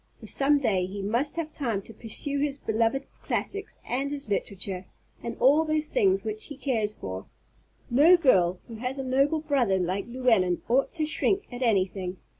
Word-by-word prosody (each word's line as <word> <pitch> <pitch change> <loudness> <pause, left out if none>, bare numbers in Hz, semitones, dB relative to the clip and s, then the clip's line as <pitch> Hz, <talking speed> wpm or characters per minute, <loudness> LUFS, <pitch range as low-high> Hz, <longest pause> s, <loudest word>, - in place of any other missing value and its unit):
For - - -11
some 285 +1 +3
day 200 -9 +1
he 195 +1 -6
must 235 +8 0
have 320 -2 -4
time 230 -8 -2
to 225 - -9
pursue 280 +6 -2
his 285 -1 0
beloved 230 +1 0 0.2
classics, 400 0 -3
and 270 +3 -1
his 285 -5 -5
literature, 190 -1 -2 0.4
and 235 -1 -5
all 290 +5 +5
those 310 -1 0
things 390 -5 +2
which 430 0 -3
he 290 - -8
cares 220 -7 -1
for. 95 0 -7 0.6
No 305 +9 +6
girl 185 - +3
who 230 - -8
has 250 +4 -4
a 270 - -3
noble 275 +4 +2
brother 255 -10 +1
like 185 +3 -2
Llewellyn 230 -8 +2
ought 255 +4 +2
to 315 -3 -1
shrink 390 +6 0
at 245 - -6
anything. 190 -5 0
250 Hz, 180 wpm, -27 LUFS, 200-290 Hz, 0.6 s, No